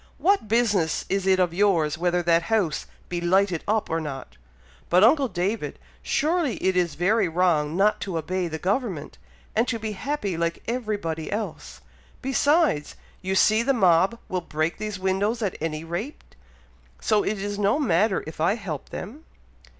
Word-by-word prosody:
What 390 - +2
business 210 -7 +1
is 195 -1 0
it 190 -1 +5
of 180 -2 +2
yours 170 -6 +2
whether 175 +1 0
that 170 0 +4
house 205 -9 0 0.2
be 175 -1 -3
lighted 185 0 +2
up 215 +1 +1
or 165 - -1
not?" 135 - -7 0.5
"But, 180 +3 +5
uncle 275 +4 +5
David! 200 +2 -2 0.2
surely 310 -3 0
it 190 0 0
is 175 -5 +1
very 190 +6 +2
wrong 165 -2 +1
not 210 +2 +3
to 185 -4 -3
obey 185 +2 -2
the 160 -1 -4
government, 185 - -2 0.4
and 225 +3 +2
to 230 - -1
be 220 -1 -4
happy 210 -3 -3
like 170 0 -2
everybody 205 -10 -3
else! 215 +1 -5 0.4
Besides, 270 - +1 0.3
you 190 0 -2
see 215 +3 +4
the 275 +4 +2
mob 190 +1 +4
will 185 -1 -2
break 155 +1 -2
those 210 -1 -4
windows 195 +5 0
at 195 - -1
any 155 -1 -3
rate, 175 - -6 0.6
so 215 -2 +2
it 215 - -1
is 205 +1 -4
no 205 +6 +2
matter 215 - +2
if 160 0 -8
I 175 +6 +3
help 170 - -6
them." 285 +9 -8
190 Hz, 165 wpm, -25 LUFS, 170-220 Hz, 0.6 s, it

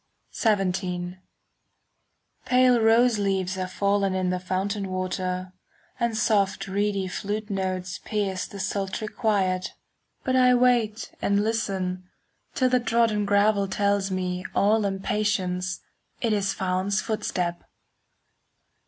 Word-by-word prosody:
XVII 185 -4 0 1.3
Pale 250 -1 +4
rose 225 0 +4
leaves 190 -2 0
have 185 -1 -4
fallen 200 -1 +1
In 185 -1 0
the 180 - -1
fountain 190 +2 -2
water; 185 0 -3 0.5
And 235 -2 0
soft 205 -3 +1
reedy 200 0 0
flute 210 +3 -4
notes 185 -1 -2
Pierce 200 -3 -2
the 200 - -9
sultry 195 +2 -2
quiet. 190 -5 0 0.5
But 260 - 0
I 250 -1 +5
wait 240 -3 +2
and 200 +1 +2
listen, 190 -5 -2 0.4
5 - - -31
Till 255 -1 +3
the 250 0 +3
trodden 225 -3 +1
gravel 200 0 +3
Tells 200 0 +1
me, 180 -1 -2
all 215 +1 +3
impatience, 190 -2 -1 0.4
It 230 -3 +1
is 200 -1 +1
Phaon's 190 +2 0
footstep. 180 -6 -2
200 Hz, 120 wpm, -25 LUFS, 185-215 Hz, 1.3 s, I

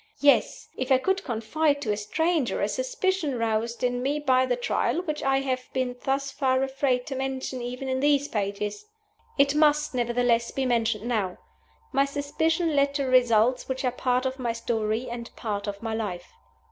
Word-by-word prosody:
Yes! 285 -1 +3
if 260 +1 -3
I 260 - +7
could 380 +8 0
confide 285 +6 0
to 215 - 0
a - - +1
stranger 315 +7 0
a - - +1
suspicion 380 - -1
roused 230 +1 -1
in 245 0 0
me 280 +3 0
by 260 -3 +2
the 250 - +1
Trial 245 +7 0
which 305 -4 -3
I 270 -2 +2
have 255 -2 -3
been 255 -2 -1
thus 275 0 0
far 260 -1 +1
afraid 265 -2 0
to 275 - -5
mention 265 -1 -3
even 250 +2 -5
in 260 0 0
these 285 0 +3
pages! 205 - -3 0.5
It 280 0 +4
must, 300 0 +3
nevertheless, 240 -1 +1
be 270 - -2
mentioned 230 -2 0
now. 205 -7 -1 0.5
My 275 0 +3
suspicion 305 +3 0
led 280 0 +2
to 280 -1 0
results 250 -1 +3
which 260 0 -2
are 250 - +2
part 250 +1 0
of 260 +1 -2
my 240 -2 -1
story 230 0 -1
and 235 -1 -6
part 205 -2 -3
of 200 +1 -5
my 225 -1 -2
life. 195 -6 -4
255 Hz, 185 wpm, -26 LUFS, 235-280 Hz, 0.5 s, I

